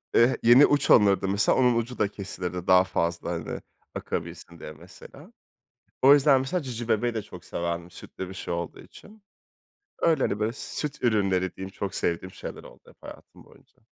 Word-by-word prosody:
Eee, 120 +3 +4
yeni 120 +5 +8
uç 145 0 +1
alınırdı 100 -3 +5
mesela 100 +2 +2
onun 125 -2 +3
ucu 115 +2 -3
da 105 - +2
kesilirdi 90 -3 -6
daha 90 0 +6
fazla 85 -2 -2
hani 85 -2 -5 0.3
akabilsin 85 -1 -6
diye 75 - -8
mesela. 95 - -15 0.7
O 135 +2 +8
yüzden 140 -1 +5
mesela 175 +7 -2
Cicibebe'yi 120 -1 -1
de 110 - -3
çok 90 -4 -13
severdim 85 0 -4
sütlü 95 +1 -9
bir - - -8
şey 95 - -5
olduğu 85 0 -5
için. 210 0 -16 0.8
Öyle, 160 -5 +2
hani, 100 - -1
böyle 110 +1 0
süt 145 +1 -6
ürünleri 95 -5 +1
diyeyim 95 0 -7
çok 100 -1 -5
sevdiğim 85 +2 -2
şeyler - - -8
oldu - - -15
hep - - -19
hayatım - - -13
boyunca. - - -23
100 Hz, 170 wpm, -26 LUFS, 90-125 Hz, 0.8 s, yeni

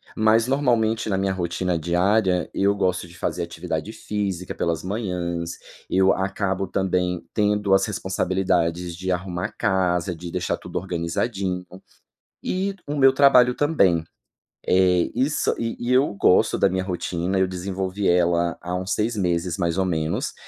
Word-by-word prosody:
Mas 110 +2 +3
normalmente 120 -5 +1
na 95 - +1
minha 95 0 0
rotina 90 0 -1
diária, 90 +2 +1
eu 100 +1 +2
gosto 90 -3 -1
de 85 0 -15
fazer 85 - -2
atividade 85 +2 -4
física 95 -4 -3
pelas 85 0 -2
manhãs. 90 -4 -3 0.3
Eu 95 +1 +4
acabo 95 0 -1
também, 90 -2 -1
tendo 105 -2 +1
as 95 0 +4
responsabilidades 90 -4 -1
de 95 +1 -3
arrumar 90 0 -3
casa, 90 -2 +1
de 85 +1 -8
deixar - - -1
tudo - - -7
organizadinho. 90 +2 -2 0.8
E 195 +2 -1
o 145 - -3
meu 135 -1 +6
trabalho 130 -3 +6
também. 100 - +2 0.6
É. 90 -1 +3
Isso. 135 +5 +1
E 115 0 -3
e 120 +1 -1
eu 130 -2 +3
gosto 100 +2 +3
da 100 - +4
minha 95 0 -1
rotina, 90 0 -2
eu 95 - +3
desenvolvi 95 +1 -3
ela 85 -1 +2
há 90 +1 -4
uns 95 +1 -2
6 110 +2 0
meses 90 -2 0
mais 85 -1 -1
ou 95 - +2
menos. 80 -2 -2
95 Hz, 150 wpm, -23 LUFS, 90-105 Hz, 0.8 s, meu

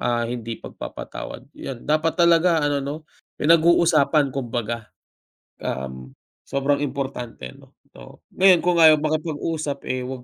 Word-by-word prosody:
ah, 120 -1 0
hindi 115 -1 -5
pagpapatawad - - -8
yan 130 -3 -7
dapat 155 +3 +1
talaga 170 -2 +4
ano 145 -1 +1
'no, 140 +2 -4 0.4
pinag 165 +2 +4
uusapan 155 -4 +3
kumbaga, 120 -4 -4 0.8
um, 65 -1 -5 0.3
sobrang 140 +1 0
importante 130 - -5
ano. - - -19 0.2
So - - -15
ngayon 185 -2 +5
kung 175 -1 +2
ayaw 160 -1 +8
makipag-usap, 155 -1 -2
eh, 130 0 -3
'wag 130 -1 -7
140 Hz, 130 wpm, -23 LUFS, 120-160 Hz, 0.8 s, ayaw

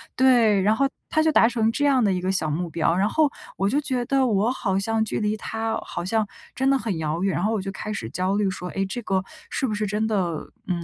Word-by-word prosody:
对， 235 -6 +4
然 215 +3 +3
后 275 - +2 0.2
他 315 - +2
就 315 - +3
达 230 - +5
成 225 -2 +1
这 290 +4 0
样 265 -4 +4
的 200 - +3
一 180 - -1
个 185 +1 0
小 160 -5 0
目 170 +3 -2
标。 165 +1 +1
然 195 +3 +2
后 310 -3 +2 0.3
我 195 - +1
就 285 +5 +2
觉 255 -3 -1
得， 270 0 +2
我 215 +2 +2
好 195 -7 -1
像 220 +2 +1
距 220 - -2
离 210 +1 0
他 225 +1 -3
好 175 - -5
像 215 +1 +1 0.3
真 265 +1 +1
的 275 - +4
很 215 -8 -3
遥 160 +3 -2
远。 195 - +1
然 - - -1
后 220 +2 +1
我 210 - -1
就 195 0 -4
开 210 +2 -6
始 115 - -5
焦 185 +7 -1
虑 205 -2 +1
说， 180 -1 -6
哎， 195 0 0
这 240 +5 -4
个 190 -2 0 0.3
是 265 - -1
不 215 - -2
是 210 0 -1
真 210 +2 0
的， 180 -7 -1 0.2
嗯， 175 -2 -2
210 Hz, 290 characters per minute, -24 LUFS, 190-235 Hz, 0.3 s, 达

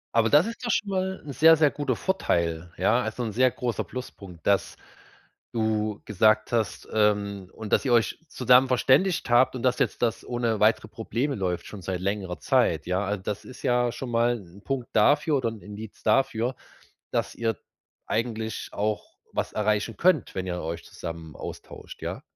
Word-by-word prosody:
Aber 115 -1 +4
das 150 +5 +6
ist 230 +2 -6
doch 240 - -2
schon 210 - 0
mal 190 -1 -2
'n 140 - -6
sehr, 160 +4 +7
sehr 150 -2 +4
guter 140 -4 -1
Vorteil, 85 - -1
ja? 110 +7 +3
Also, 110 +1 -3
'n 110 - -2
sehr 130 +4 +4
großer 120 -1 -2
Pluspunkt, 100 -9 -9
dass 100 -1 +2 0.8
du 110 -2 0
gesagt 110 +1 +3
hast 115 -2 -1
ähm, 100 -3 +1
und 110 -2 -6
dass - - +4
ihr 125 - +3
euch 115 -2 +2
zusammen 125 -1 +4
verständigt 135 +6 +3
habt 130 +2 +5
und 120 - -5
dass 125 -1 +2
jetzt - - 0
das 115 -4 0
ohne 120 -3 -1
weitere 110 0 +3
Probleme 120 +6 -2
läuft 90 -3 -2
schon 100 -3 -9
seit 90 +1 -3
längerer 95 -2 -2
Zeit, - - +2
ja? 90 +2 0
Also, 100 -1 -3
das 105 +1 -4
ist 130 - -12
ja 120 -2 +2
schon 120 0 -6
mal 120 +1 +2
'n 95 +1 -15
Punkt 135 -4 -3
dafür 145 +7 +4
oder 120 -3 0
'n 110 -2 -9
Indiz 105 +1 -10
dafür, 125 -2 +2 0.6
dass - - -1
ihr 115 -2 -1 0.5
eigentlich 110 -1 -2
auch 105 +1 -3 0.2
was - - -2
erreichen 105 +1 0
könnt, 185 +1 +2
wenn 95 -1 -3
ihr 90 -1 -2
euch 85 +1 -4
zusammen 80 -1 -8
austauscht, - - -9
ja? - - -5
110 Hz, 180 wpm, -26 LUFS, 100-125 Hz, 0.8 s, sehr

